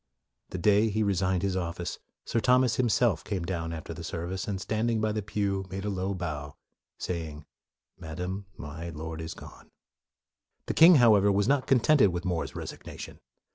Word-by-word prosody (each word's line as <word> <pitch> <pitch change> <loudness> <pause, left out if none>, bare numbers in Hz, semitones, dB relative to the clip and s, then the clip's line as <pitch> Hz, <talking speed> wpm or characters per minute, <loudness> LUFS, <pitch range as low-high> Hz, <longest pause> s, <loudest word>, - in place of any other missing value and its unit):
The - - -5
day 105 +4 +4
after 110 - -1
he 110 +1 +1
resigned 95 -2 +1
his 95 -2 0
office, 85 -1 -3 0.3
Sir 115 - 0
Thomas 125 -1 +3
himself 115 -6 +2
came 95 -5 -3
down 85 -2 -3
after 85 0 -6
the 85 +1 -8
service 90 +4 -4
and 100 -2 -2
standing 110 +3 0
by 110 0 +1
the 105 0 -2
pew 100 -1 -2
made 95 +2 -5
a 105 - -1
low 95 +1 -2
bow, 75 -5 -5 0.4
saying, 80 -4 -5 0.3
" - - -61
Madam, 90 +5 -5
my 80 +3 -7
Lord 80 0 -6
is 80 - -6
gone." - - -13 1.0
The - - -2
king, 165 +2 +8
however, 105 -6 +6
was 100 +1 +2
not 135 0 +2
contented 135 -2 +5
with 90 +1 -4
More's 90 -3 -2
resignation. - - -8
95 Hz, 175 wpm, -28 LUFS, 85-110 Hz, 1.0 s, king